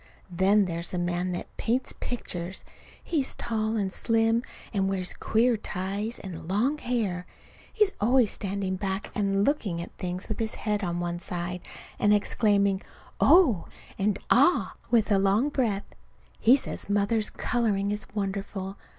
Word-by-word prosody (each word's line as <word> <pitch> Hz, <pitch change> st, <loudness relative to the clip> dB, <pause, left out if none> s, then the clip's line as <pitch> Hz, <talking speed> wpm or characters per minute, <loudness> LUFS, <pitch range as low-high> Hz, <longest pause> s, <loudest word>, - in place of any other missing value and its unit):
Then 195 Hz, +3 st, +4 dB
there's 170 Hz, -1 st, -3 dB
the 180 Hz, -, -3 dB
man 175 Hz, +1 st, -1 dB
that 175 Hz, -, -6 dB
paints 245 Hz, +3 st, 0 dB
pictures. 185 Hz, -6 st, -4 dB, 0.4 s
He's 290 Hz, -6 st, -1 dB
tall 220 Hz, -1 st, -1 dB
and 195 Hz, -2 st, -1 dB
slim, 225 Hz, 0 st, +2 dB, 0.3 s
and 195 Hz, -2 st, +1 dB
wears 185 Hz, -2 st, -2 dB
queer 230 Hz, +1 st, +2 dB
ties 200 Hz, +4 st, -3 dB
and 175 Hz, -4 st, -8 dB
long 240 Hz, -, +1 dB
hair. 215 Hz, -9 st, -1 dB, 0.4 s
He's 425 Hz, -3 st, +3 dB
always 240 Hz, +1 st, +4 dB
standing 195 Hz, -1 st, -2 dB
back 195 Hz, +1 st, -3 dB
and 200 Hz, -1 st, +1 dB
looking 210 Hz, -, 0 dB
at 170 Hz, -, -7 dB
things 180 Hz, +1 st, -4 dB
with 215 Hz, -, -4 dB
his 220 Hz, -1 st, -2 dB
head 210 Hz, -2 st, -1 dB
on 175 Hz, -1 st, -1 dB
one 175 Hz, 0 st, -2 dB
side, 175 Hz, 0 st, -4 dB, 0.4 s
and 205 Hz, 0 st, +5 dB
exclaiming 200 Hz, -2 st, +2 dB, 0.4 s
"Oh!" 275 Hz, -, +5 dB, 0.3 s
and 200 Hz, +1 st, +1 dB
"Ah!" 280 Hz, +9 st, +4 dB, 0.2 s
with 225 Hz, -2 st, +3 dB
a 200 Hz, -, +5 dB
long 200 Hz, +8 st, +3 dB
breath. 225 Hz, -8 st, 0 dB, 0.5 s
He 240 Hz, +4 st, +7 dB
says 275 Hz, -, -4 dB
Mother's 205 Hz, +2 st, +1 dB
coloring 205 Hz, -5 st, 0 dB
is 210 Hz, 0 st, -3 dB
wonderful. 195 Hz, -1 st, -3 dB
200 Hz, 150 wpm, -27 LUFS, 190-225 Hz, 0.5 s, He